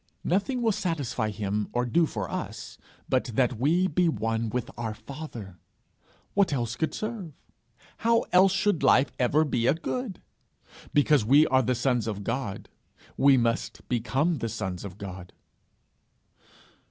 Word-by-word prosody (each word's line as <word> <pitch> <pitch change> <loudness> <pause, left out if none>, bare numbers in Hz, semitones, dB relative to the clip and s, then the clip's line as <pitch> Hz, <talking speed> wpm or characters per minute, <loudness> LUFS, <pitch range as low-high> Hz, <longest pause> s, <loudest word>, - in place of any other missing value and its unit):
Nothing 220 +8 0
will 225 - +3
satisfy 155 - -2
him, 105 0 -2
or 120 0 +1
do 165 +6 +2
for 105 -8 -4
us, - - -6 0.3
but 130 - +1
that 125 -3 +1
we 165 +8 +3
be 175 +1 +2
one 115 -5 -1
with 125 +1 -3
our 110 -2 -4
father! 115 - -9 0.7
What 200 -4 +3
else 120 -4 -1
could 160 - -2
serve! 215 -8 -5 0.6
How 230 0 +3
else 185 +1 +6
should 190 -2 +1
life 130 0 +4
ever 135 +5 +3
be 120 -4 0
a 140 - +4
good! 210 +4 -4 0.7
Because 145 -3 +4
we 140 +8 +6
are 130 -2 +3
the 125 +1 0
sons 125 -2 0
of 100 -2 -4
God, 115 -2 -3 0.5
we 140 -1 +5
must 115 -1 -1
become 135 +7 0
the 115 - -2
sons 95 -5 -4
of 100 -2 -8
God. 95 -3 -8
130 Hz, 150 wpm, -27 LUFS, 115-165 Hz, 0.7 s, else